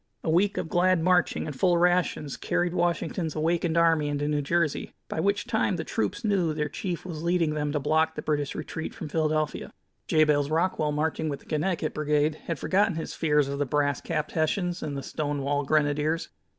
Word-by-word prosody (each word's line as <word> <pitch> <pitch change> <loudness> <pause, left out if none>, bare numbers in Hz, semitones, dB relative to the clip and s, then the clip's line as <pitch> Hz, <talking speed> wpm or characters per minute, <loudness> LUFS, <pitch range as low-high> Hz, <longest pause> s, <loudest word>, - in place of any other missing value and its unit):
A 160 - 0
week 195 +5 +2
of - - -2
glad 180 +2 +3
marching 180 -4 +2
and 150 -3 -5
full 175 +5 +3
rations 175 -5 +1
carried 175 0 -1
Washington's 175 -2 -1
awakened 165 +1 0
army 165 -3 +4
into 145 0 -1
New 150 -1 +1
Jersey, 155 +1 -1
by - - -4
which 200 +4 +1
time 220 -5 +1
the 160 - -3
troops 105 -8 -2
knew 185 -7 +1
their 150 -1 -1
chief 175 +3 -4
was 165 -4 -6
leading 170 -2 +1
them 150 -1 -1
to 150 - 0
block 160 +3 +1
the - - -5
British 145 -2 -1
retreat 160 +1 -5
from 155 - -6
Philadelphia. 155 -1 -1 0.4
Jabez 150 -2 +3
Rockwell, 160 -2 +1
marching 155 +1 -1
with 140 - -4
the - - -20
Connecticut 160 0 -1
Brigade, 150 0 +1
had 165 - -2
forgotten 200 +2 +2
his 160 - -4
fears 150 -3 +2
of 140 0 -4
the 145 - +1
brass 145 0 +1
capped 155 -2 -2
Hessians 175 +2 0
and 145 -2 -4
the 135 - -5
stone 145 0 -3
wall 145 +1 0
Grenadiers. 150 +2 +1
155 Hz, 195 wpm, -27 LUFS, 150-175 Hz, 0.4 s, army